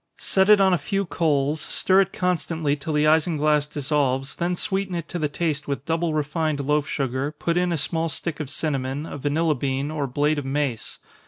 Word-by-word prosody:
Set 190 +1 +2
it 210 -1 +8
on 190 -1 +4
a 175 - +2
few 195 +7 -1
coals, 150 -3 0
stir 190 +1 +3
it 195 0 -1
constantly 165 -4 0
till 150 +2 -5
the 150 0 +2
isinglass 155 -2 +3
dissolves, 135 -2 0
then 175 +1 -1
sweeten 190 0 -2
it 170 -1 -4
to 175 - -4
the 150 -2 0
taste 150 -1 -2
with 140 -1 -3
double 165 -1 0
refined 155 0 -1
loaf 145 +1 +1
sugar, 135 +1 -2
put 165 +2 -2
in 180 0 +1
a 170 - 0
small 165 +2 -1
stick 155 +3 -4
of 150 -4 -4
cinnamon, 140 -1 -2
a 145 - -7
vanilla 155 +3 +1
bean, 135 +1 -2
or 150 -3 -2
blade 145 +4 +1
of - - -5
mace. 135 -4 -2
150 Hz, 200 wpm, -24 LUFS, 140-170 Hz, -, it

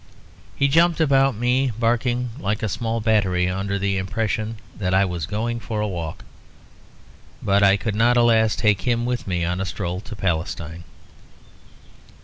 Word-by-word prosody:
He 140 - +2
jumped 165 +4 +3
about 135 -4 +3
me, 125 +3 +1
barking 120 +1 0
like 105 -1 -2
a 110 - 0
small 115 +3 -2
battery, 100 -5 +2
under 95 +2 -2
the 100 -1 0
impression 110 +3 -2 0.2
that 95 -2 -1
I 95 +1 +4
was 90 -5 -4
going 115 +3 -2
for 110 -1 -4
a 105 - 0
walk; 85 -5 -5 1.2
but 100 0 +3
I 100 0 +5
could 110 +1 -3
not, 120 +3 +3
alas, 115 -2 +4
take 105 -4 +2
him 120 +2 0
with 125 -2 -2
me 90 -2 -1
on 90 +2 -2
a - - -1
stroll 90 0 -4
to 110 0 -9
Palestine. 85 -2 -3
105 Hz, 160 wpm, -22 LUFS, 95-120 Hz, 1.2 s, I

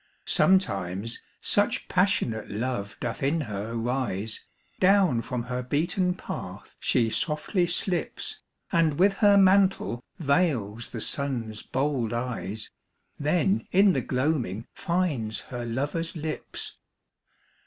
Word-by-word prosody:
Sometimes 100 - +2 0.2
such 205 +3 +1
passionate 180 - +1
love 105 -2 -3
doth 120 -1 -3
in 145 +4 +1
her 105 -2 -4
rise, 115 -3 -2 0.4
Down 185 -10 +4
from 120 0 -3
her 125 +1 -3
beaten 175 +8 0
path - - -7
she 115 -2 +2
softly 170 - 0
slips, 190 - -1 0.3
And 160 -3 +3
with 195 +2 +5
her 205 -1 +7
mantle 190 -10 +4
veils 135 - 0
the 115 - -5
Sun's 120 -7 -1
bold 130 -4 -1
eyes, 115 -3 -3 0.5
Then 180 +7 +1
in 195 +1 +5
the - - +1
gloaming 125 - -1
finds 160 - -1
her 120 -2 -6
lover's 145 +8 -2
lips. 155 -1 -5
140 Hz, 110 wpm, -27 LUFS, 115-180 Hz, 0.5 s, her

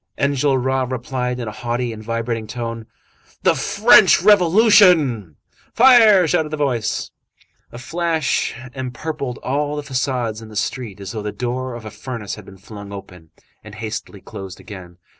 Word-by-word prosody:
Enjolras 135 -2 0
replied 125 0 -3
in 120 - -5
a - - -4
haughty 120 +2 -3
and 110 0 -10
vibrating 115 0 -3
tone:— 115 0 -6 0.6
"The - - +4
French - - +5
Revolution!" 180 - +5 0.4
"Fire!" 225 -7 +7
shouted 155 0 +1
the 155 - -4
voice. 125 -7 -2 0.6
A - - -9
flash 160 +3 -1 0.2
empurpled 130 +1 -5
all 145 +2 -1
the 150 - -4
façades 125 -5 -2
in 110 - -11
the 105 - -12
street 105 -1 -4
as 100 -1 -7
though 110 - -5
the 105 0 -4
door 125 +1 -4
of 115 -2 -9
a 110 - -7
furnace 110 -1 -6
had 105 - -9
been 95 - -14
flung 100 +1 -11
open, 90 -5 -11 0.3
and 105 -1 -11
hastily 110 -2 -6
closed 95 -1 -9
again. 90 -4 -11
125 Hz, 155 wpm, -20 LUFS, 110-145 Hz, 0.6 s, Fire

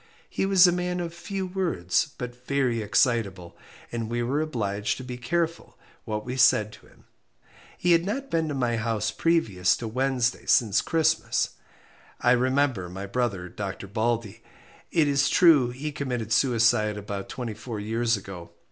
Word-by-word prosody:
He 195 - -1
was 190 -2 +6
a 175 - +5
man 180 0 -2
of 170 -1 -4
few 190 +3 -4
words, 170 - -1
but 125 0 -8
very 130 -5 +1
excitable, 105 -5 0 0.4
and 115 -2 -3
we 120 0 -1
were 135 +5 0
obliged 105 -9 -2
to 130 - -7
be 125 -1 -6
careful 165 +7 -2 0.3
what 105 -1 -4
we 125 +1 -4
said 110 -4 +4
to - - -16
him. - - -23 0.7
He 175 - +1
had 170 0 +5
not 270 +9 -4
been 165 -1 +1
to 145 - -3
my 120 -3 0
house 110 -1 -1
previous 105 - +1
to 115 - -5
Wednesday 125 +1 -1
since 110 -2 +4
Christmas. 160 -1 +1 0.7
I 125 - +3
remember 130 -6 +1
my 95 +2 -6
brother, 100 -4 -2
Dr. 100 +1 -6
Baldey 110 0 -2 0.5
it 160 -3 +2
is 140 -1 +2
true 150 -8 +5
he 135 +5 -5
committed 125 -7 -3
suicide 110 -3 +3
about 100 -1 -6
twenty 120 -3 -5
four 110 +1 -7
years 115 +2 0
ago. 95 -3 -9
120 Hz, 165 wpm, -26 LUFS, 105-150 Hz, 0.7 s, was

